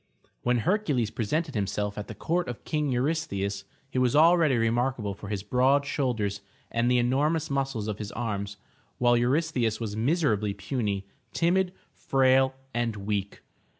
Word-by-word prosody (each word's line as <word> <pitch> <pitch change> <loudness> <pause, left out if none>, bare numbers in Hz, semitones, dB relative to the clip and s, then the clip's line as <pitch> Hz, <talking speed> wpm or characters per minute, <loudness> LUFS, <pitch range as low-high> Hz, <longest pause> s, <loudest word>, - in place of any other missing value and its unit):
When 125 0 +2
Hercules 145 - +1
presented 150 +11 -1
himself 105 0 -2
at 105 - -6
the 110 - -7
court 175 - -1
of 120 - -7
King 150 -3 0
Eurystheus, 120 -8 -1 0.2
he 130 - -2
was 125 0 +2
already 160 -3 +5
remarkable 115 -2 0
for 100 +1 -10
his 100 -2 -3
broad 130 +6 +3
shoulders 110 -8 -1 0.3
and 115 +1 +1
the 125 - +4
enormous 145 +6 +1
muscles 135 -6 -1
of 105 -1 -3
his 105 -1 -5
arms, 100 -4 -3 0.4
while 120 -1 +4
Eurystheus 125 -3 +1
was 110 -3 -4
miserably 110 - +1
puny, 100 -2 -2 0.3
timid, 180 +2 +2 0.2
frail 130 0 +3 0.2
and 120 -2 -1
weak. 100 -1 -3
120 Hz, 150 wpm, -27 LUFS, 105-140 Hz, 0.4 s, already